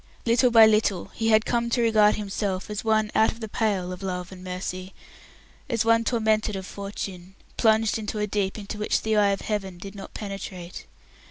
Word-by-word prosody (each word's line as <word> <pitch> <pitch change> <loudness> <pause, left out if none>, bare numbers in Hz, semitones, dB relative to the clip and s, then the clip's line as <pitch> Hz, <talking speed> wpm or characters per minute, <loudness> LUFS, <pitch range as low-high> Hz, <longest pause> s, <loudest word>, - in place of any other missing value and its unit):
Little 240 +2 +4
by 225 -2 +8
little 215 -4 +2
he 225 - -2
had 220 0 +4
come 235 -1 0
to 240 +1 +1
regard 215 -2 +4
himself 200 -1 -3
as 210 - -4
one 215 -1 +1
out 220 - +4
of 225 - -12
the 220 - -5
pale 200 -4 -1
of 180 - -9
love 180 -1 -4
and 185 -1 -11
mercy, 185 +1 -5 0.7
as 230 -3 0
one 230 0 +4
tormented 220 -3 +1
of 190 -1 -5
fortune, 195 -2 -7 0.2
plunged 220 -1 +3
into 215 0 -4
a 210 - 0
deep 200 -1 -2
into 210 0 -7
which 210 - 0
the 220 0 +1
eye 205 -1 +4
of 195 - -1
Heaven 195 -4 -3
did 195 +2 -9
not 195 -2 -10
penetrate. 195 -3 -7
210 Hz, 195 wpm, -25 LUFS, 195-220 Hz, 0.7 s, by